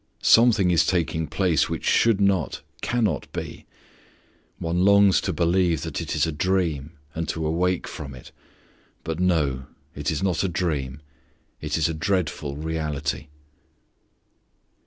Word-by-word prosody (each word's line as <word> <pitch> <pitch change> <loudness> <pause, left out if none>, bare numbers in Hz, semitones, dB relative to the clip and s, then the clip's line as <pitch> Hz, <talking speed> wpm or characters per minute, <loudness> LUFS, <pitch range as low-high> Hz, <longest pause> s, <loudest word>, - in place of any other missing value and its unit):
Something 115 -6 +5
is 85 - +4
taking 80 -3 0
place 80 0 +1
which - - -4
should 115 -4 +3
not, 100 -5 +1 0.2
cannot 110 - -1
be; - - -7 0.9
one 85 +2 -1
longs 100 -1 +5
to - - -1
believe 85 -3 +1
that - - -4
it - - -4
is - - +2
a 80 - -2
dream 80 -3 -1 0.2
and 80 0 -3
to 80 -1 -2
awake 90 +3 0
from 70 -4 -7
it. 65 - -13 0.7
But 80 0 -4
no, 75 -8 +1 0.3
it 75 +1 -3
is 80 +2 -2
not 95 -3 +1
a 95 - 0
dream, 75 -6 -2 0.6
it - - -2
is 80 -1 +2
a 80 - -2
dreadful 80 -4 -1
reality! 75 -2 -3
80 Hz, 140 wpm, -24 LUFS, 75-95 Hz, 0.9 s, Something